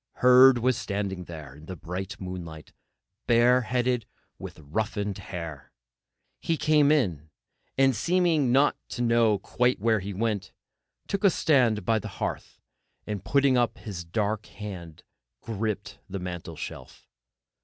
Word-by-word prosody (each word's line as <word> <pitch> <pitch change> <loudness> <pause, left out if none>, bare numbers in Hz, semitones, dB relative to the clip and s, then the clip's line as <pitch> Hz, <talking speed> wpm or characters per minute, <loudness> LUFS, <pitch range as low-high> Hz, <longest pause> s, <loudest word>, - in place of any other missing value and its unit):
Herd 125 +1 +7
was 125 +1 +1
standing 100 -3 -3
there 80 -5 -9
in 75 +2 -14
the 95 - -6
bright 95 +4 -6
moonlight, 85 -5 -8 0.5
bareheaded, 125 0 +2 0.3
with - - -8
roughened 100 +6 -3
hair. 80 -6 -7 0.7
He 165 - -1
came 150 -2 +4
in, 90 - 0 0.5
and 135 -1 +4
seeming 165 - +2
not 140 +3 +4
to 120 - -3
know 115 -3 +3
quite 125 +5 0
where 110 +1 +2
he 100 +1 -6
went, 105 -3 -2 0.5
took 200 0 -2
stand 125 - +2
by 110 +1 +2
the 110 - -7
hearth, - - -4 0.5
and 105 -3 -4
putting 140 +1 +3
up 120 -1 0
his 95 -7 -7
dark 105 +5 -2
hand, 90 -6 -9 0.4
gripped 110 -1 -4
the 100 - -4
mantelshelf. 90 -4 -7
110 Hz, 130 wpm, -27 LUFS, 90-125 Hz, 0.7 s, Herd